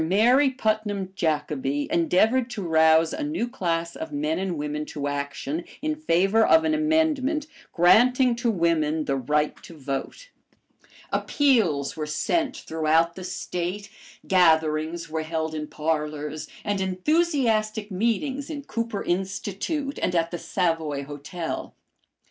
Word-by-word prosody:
Mary 235 - +4
Putnam 215 -6 -2
Jacobi 145 -4 -1
endeavored 220 +9 +2
to 215 -5 -5
rouse 160 -1 +4
a - - -4
new 295 -4 -1
class 170 -8 -2
of 160 -1 -6
men 150 +3 -1
and 185 -3 -2
women 150 +1 -3
to 145 -2 -4
action 145 +2 -3 0.2
in 310 +2 -1
favor 215 - +2
of 320 +7 +5
an 315 -1 +1
amendment 310 -2 +1 0.3
granting 245 +8 +5
to 240 0 0
women 160 -5 +1
the 140 - 0
right 150 +3 0
to 165 - -12
vote. 140 - -5 0.8
Appeals 210 - +2
were 155 -1 -4
sent 275 - 0
throughout 160 +1 +1
the 185 - -8
State, 180 +2 -4 0.4
gatherings 160 -2 +2
were 160 0 -3
held 160 0 -3
in 150 -1 -4
parlors, 150 -1 -3 0.2
and 205 -2 -1
enthusiastic 220 - +1
meetings 260 - -1
in 290 -3 -5
Cooper 230 -4 -3
Institute 200 - -2
and 180 - 0
at 165 0 +1
the 175 - -4
Savoy 160 -6 -1
Hotel. 150 +4 -6
180 Hz, 130 wpm, -25 LUFS, 155-235 Hz, 0.8 s, of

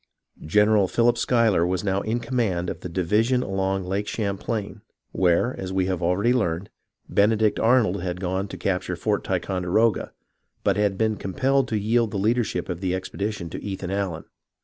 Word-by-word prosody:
General 105 +2 +4
Philip 120 +4 +3
Schuy 115 -1 +2
ler 85 -3 +2
was 90 0 -1
now 100 -1 0
in 110 +3 -1
command 110 -9 -1
of - - -7
the 90 - -7
division 105 +9 +1
along 95 -1 -1
Lake 100 +3 -2
Cham 100 -3 -2
plain, 105 -1 -4 0.3
where, 95 +7 +2
as 95 -1 -4
we 95 -1 +1
have 95 -1 -2
already 95 +8 +2
learned, 95 -6 -1 0.4
Benedict 105 +1 +2
Arnold 110 -5 +3
had 90 0 -3
gone 95 +1 -2
to - - -8
capture 90 -1 -1
Fort 105 +4 -1
Ticonderoga, 95 +3 0 0.5
but 100 - +2
had 100 -1 +1
been 110 0 +1
com 95 - -6
pelled 135 -1 +2
to 110 - -1
yield 115 +2 +1
the 100 - -4
leadership 110 +2 0
of 90 -1 -5
the 95 -1 0
expedition 100 0 -4
to - - -6
Ethan 95 -2 -4
Allen. 95 -5 -2
100 Hz, 180 wpm, -24 LUFS, 95-110 Hz, 0.5 s, General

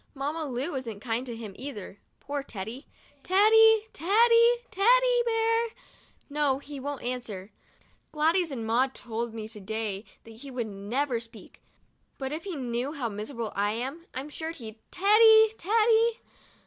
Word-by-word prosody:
Mamma 295 +4 -3
Lu 270 +4 -3
isn't 235 -6 -5
kind 235 +3 -3
to 235 - -5
him 220 -3 -8
either 210 -7 -8
— - - -45
poor 285 0 -3
Teddy. 230 +2 -7 0.3
Teddy! 435 +4 +6
Teddy! 465 +7 +5 0.2
Teddy - - +4
Bear! 455 0 +2 0.6
No, 285 -2 +1
he 285 0 -9
won't 285 +1 -5
answer. 225 -6 -5 0.6
Gladys 325 +3 +2
and 245 -6 -5
Maud 250 +4 +1
told 230 -1 -5
me 215 -1 -5
to 220 -1 -9
day 215 0 -3 0.2
that 225 - -13
he 275 +4 -10
never 240 +2 -2
would - - -5
speak 230 -1 -13 0.3
— - - -43
but 265 -1 -4
if 315 +5 -5
he 380 -4 -4
knew 250 +1 -3
how 255 -7 -3
miserable 220 +2 -5
I 205 +1 +1
am, 270 +9 -5
I'm 270 +3 -5
sure 320 +2 -5
he'd 225 -9 -8
Teddy! 440 +3 +6
Teddy! 450 +3 +3
275 Hz, 160 wpm, -28 LUFS, 230-375 Hz, 0.6 s, Teddy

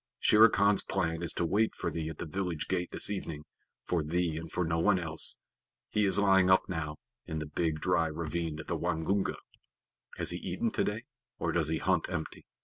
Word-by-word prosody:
Shere 110 +2 +7
Khan's 100 -1 +3
plan 85 -4 -1
is 85 - +1
to 85 - -1
wait 105 +6 +1
for - - -3
thee 80 -1 -3
at 80 - -8
the - - -5
village 90 -1 -3
gate 90 -2 -1
this - - +3
evening 80 -7 -4 0.4
for 85 -2 0
thee 85 +1 -1
and 80 0 -6
for 90 - 0
no 80 0 0
one 85 - +4
else. 80 -2 -1 0.5
He 105 -1 +2
is 95 - +3
lying 95 -2 +4
up 95 - +4
now, 75 -4 -4 0.3
in 80 - -3
the 75 - -3
big 75 +1 -1
dry 85 -3 +2
ravine 80 0 -3
of - - -7
the 85 - -2
Waingunga." 90 +4 0 0.8
"Has - - +1
he - - -3
eaten - - -2
today, - - -1 0.3
or - - -1
does 80 -3 +1
he 80 0 0
hunt - - +1
empty?" 80 -3 -5
85 Hz, 205 wpm, -31 LUFS, 80-95 Hz, 0.8 s, Shere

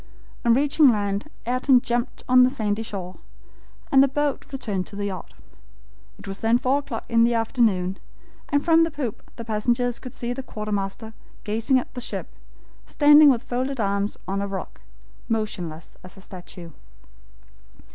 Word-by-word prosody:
On 235 -1 +4
reaching 290 +2 +4
land, 205 +2 -1 0.2
Ayrton 255 +2 +3
jumped 240 0 -3
on 255 0 +6
the 250 - +6
sandy 215 -3 -2
shore, 190 -4 -6 0.7
and 270 - +7
the 275 - +5
boat 290 +1 -2
returned 205 -9 -3
to - - -9
the 200 0 -3
yacht. 190 -2 -6 0.8
It - - -13
was 195 0 -5
then 225 +1 +3
four 260 +3 +1
o'clock 260 -6 -6
in 230 0 +3
the 235 0 +3
afternoon, 220 -5 +1 0.5
and 285 -2 +1
from 330 -1 +5
the 330 - +1
poop 280 -8 -5
the 230 - -8
passengers 235 +2 0
could 255 - -10
see 240 0 -3
the 270 - -5
quartermaster 215 -1 -4 0.3
gazing 225 +5 +1
at 255 - -4
the 250 - -6
ship, - - -5 0.6
standing 295 0 +7
with 250 -2 +2
folded 260 +1 -3
arms 200 0 -1
on 195 +1 -1
a 200 - -2
rock, 195 -2 -7 0.5
motionless 180 -8 -3
as 185 +1 -12
a - - -12
statue. 180 -2 -10
230 Hz, 165 wpm, -24 LUFS, 200-255 Hz, 0.8 s, and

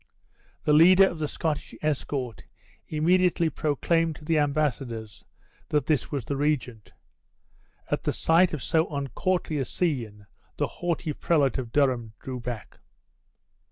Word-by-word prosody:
The 150 - +3
leader 185 +5 +7
of 170 - -5
the 150 - -1
Scottish 155 0 -3
escort 135 -5 -2 0.4
immediately 170 +1 +2
proclaimed 160 +3 0
to 150 - -13
the 160 -1 +2
embassadors 135 -8 -2 0.5
that 150 -1 +1
this 155 -4 0
was 140 -6 -3
the 140 - -2
regent. 135 -7 -2 1.0
At - - -1
the - - +2
sight 170 +2 +3
of 150 -6 -4
so 160 -1 +2
uncourtly 155 +3 -2
a 135 - -1
scene 115 - -2 0.3
the - - +1
haughty 170 -3 -3
prelate 140 -5 +1
of 120 -3 -6
Durham 125 -6 +1
drew 130 -1 -6
back. 120 -2 -7
150 Hz, 135 wpm, -26 LUFS, 130-165 Hz, 1.0 s, leader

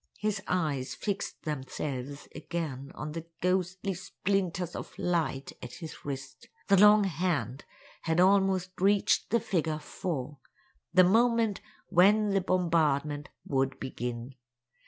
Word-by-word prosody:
His 210 -2 -1
eyes 150 -7 -1
fixed 200 -1 -4
themselves 140 -1 -4
again 145 -6 -5
on 150 0 -5
the 165 +1 -6
ghostly 185 +2 0
splinters 185 -1 -2
of - - -7
light 165 -6 -1
at 125 0 -8
his 160 +2 -9
wrist. 135 -2 -7 0.2
The 195 -1 +6
long 210 0 +8
hand 155 - -1 0.4
had 160 +1 0
almost 190 -1 +3
reached 200 +1 +3
the 235 - +3
figure 165 -8 -1
4—the 145 - -2
moment 225 +1 +3 0.3
when 205 +4 +5
the 195 0 +2
bombardment 155 -5 +1 0.2
would 135 -1 0
begin. 125 0 -5
170 Hz, 115 wpm, -29 LUFS, 140-195 Hz, 0.4 s, long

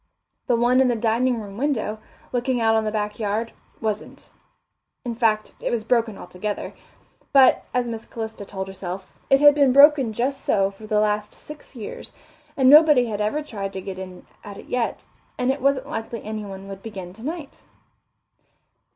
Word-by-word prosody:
The 245 - +3
one 245 +2 +3
on 265 - +4
the 240 - +1
dining 235 +2 +1
room 200 -2 -9
window, 230 -6 -1 0.3
looking 250 0 0
out 225 -1 +3
on 220 0 +2
the 215 - -1
back 210 0 -3
yard, 220 +2 -1 0.3
wasn't; 215 -1 -5 0.7
in 240 - -2
fact, 220 -2 0
it - - -2
was 230 -2 -1
broken 230 -3 +1
altogether; 205 +3 -5 0.6
but, 270 -3 +5
as 250 -1 0
Miss 225 -1 -5
Calista 220 -2 -6
told 190 -1 -6
herself, 190 0 -7
it 270 - +5
had 290 0 +8
been 280 -3 +4
broken 280 -3 +6
just 265 +5 -2
so 195 0 +2
for 215 +2 -13
the 210 -1 +2
last 210 0 0
six 300 -2 -12
years, 220 -4 -8 0.4
and 265 -2 +4
nobody 295 -3 +7
had 210 -3 -3
ever 255 +9 -1
tried 200 -8 -5
to 190 - -4
get 190 0 -7
in 185 -1 -9 0.2
at 205 -1 -9
it - - -11
yet, 245 -2 -2 0.3
and 250 +1 +1
it 275 - -4
wasn't 275 0 +1
likely 225 -3 -5
anyone 205 -3 -6
would 195 -1 -8
begin 190 -5 -8
tonight. 285 - -7
225 Hz, 175 wpm, -23 LUFS, 210-255 Hz, 0.7 s, had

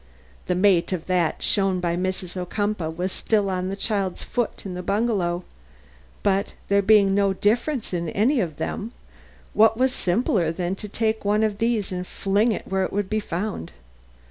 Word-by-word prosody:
The 180 - +1
mate 185 -2 +3
of 170 -3 -3
that 180 -3 0
shown 195 -2 +2
by 170 -1 0
Mrs. 185 0 -2
Ocumpaugh 185 -1 -2
was 180 +2 -2
still 205 -2 +1
on 185 0 -2
the 195 - -3
child's 200 -3 -1
foot 240 -4 -3
in 190 - -4
the 180 - -4
bungalow, 190 -3 0 0.8
but 200 0 +1 0.2
there 200 0 +4
being 200 -1 +5
no 200 -1 +3
difference 230 +5 0
in 170 -2 -1
any 240 - +2
of 165 -8 -2
them, 225 +4 -4 0.6
what 220 +1 +5
was 260 +1 +2
simpler 180 -4 +1
than 175 +2 -2
to 210 - -7
take 220 +1 -1
one 210 +2 +2
of 210 -2 0
these 230 -4 0
and 180 0 -4
fling 205 +4 +1
it - - -4
where 190 0 0
it - - -2
would 205 0 -2
be 215 - +2
found. 185 - -4
195 Hz, 180 wpm, -24 LUFS, 180-215 Hz, 0.8 s, being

